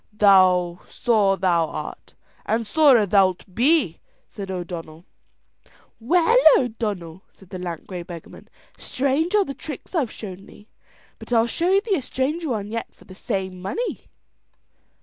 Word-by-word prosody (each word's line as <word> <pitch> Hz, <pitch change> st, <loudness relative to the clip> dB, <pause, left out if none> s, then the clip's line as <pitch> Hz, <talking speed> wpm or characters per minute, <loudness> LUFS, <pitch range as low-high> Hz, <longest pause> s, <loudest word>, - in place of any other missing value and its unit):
"Sore 195 Hz, +2 st, +3 dB
thou 175 Hz, -3 st, +2 dB
art; -, -, -8 dB, 0.3 s
and 225 Hz, +1 st, 0 dB
sorer 260 Hz, -2 st, +5 dB
thou'lt 190 Hz, -1 st, +1 dB
be," 255 Hz, -, +2 dB, 0.3 s
said 195 Hz, -2 st, -8 dB
O'Donnell. 170 Hz, -3 st, -7 dB, 0.9 s
"Well, 340 Hz, -, +3 dB, 0.2 s
O'Donnell," 205 Hz, -8 st, -3 dB
said 190 Hz, -2 st, -20 dB
the 185 Hz, -, -6 dB
lank 175 Hz, -3 st, -6 dB
grey 185 Hz, -3 st, -6 dB
beggarman, 170 Hz, -1 st, -11 dB, 0.3 s
"strange 280 Hz, +8 st, 0 dB
are 410 Hz, -2 st, +4 dB
the 275 Hz, -, -5 dB
tricks 290 Hz, +4 st, -9 dB
I've 295 Hz, -10 st, 0 dB
shown 195 Hz, -3 st, -9 dB
thee, 205 Hz, -, -17 dB, 0.5 s
but -, -, -12 dB
I'll 230 Hz, -1 st, +4 dB
show 350 Hz, +11 st, +2 dB
thee 405 Hz, -2 st, 0 dB
a -, -, -3 dB
stranger 290 Hz, +6 st, -2 dB
one 210 Hz, -3 st, -3 dB
yet 230 Hz, 0 st, -4 dB
for -, -, -20 dB
the 185 Hz, -, -13 dB
same 185 Hz, -1 st, -4 dB
money." 460 Hz, -, -4 dB
210 Hz, 140 wpm, -23 LUFS, 185-270 Hz, 0.9 s, sorer